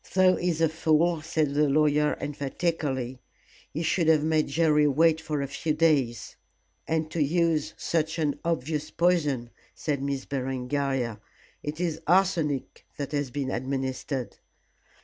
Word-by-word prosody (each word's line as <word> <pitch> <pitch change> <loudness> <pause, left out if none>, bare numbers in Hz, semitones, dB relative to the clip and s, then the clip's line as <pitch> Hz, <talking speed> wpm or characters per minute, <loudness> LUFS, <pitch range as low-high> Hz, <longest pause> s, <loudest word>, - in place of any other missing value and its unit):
"Though 185 -1 +5
he's 170 -2 -1
a 165 - +5
fool," 160 +1 +2
said 155 -2 0
the 150 0 +3
lawyer, 150 +1 +3
emphatically. 140 -3 -2 0.5
"He 160 - -3
should 170 0 +1
have 155 -2 +5
made 155 -1 +2
Jerry 150 0 +3
wait 160 +3 +3
for 150 -3 -2
a - - -3
few 150 +3 -2
days." 145 -7 +1 0.5
"And 160 -1 -1
to 165 - -1
use 160 0 +1
such 160 0 -1
an 145 -3 0
obvious 155 -2 -2
poison," 150 -9 +1 0.2
said 145 -3 -2
Miss 140 -1 -2
Berengaria; 130 -2 -2 0.4
"it 150 +2 -5
is 165 -2 -2
arsenic 170 -6 +1
that 140 -1 -4
has 145 -3 -1
been 135 0 -3
administered." 130 0 -3
150 Hz, 140 wpm, -27 LUFS, 140-160 Hz, 0.5 s, Though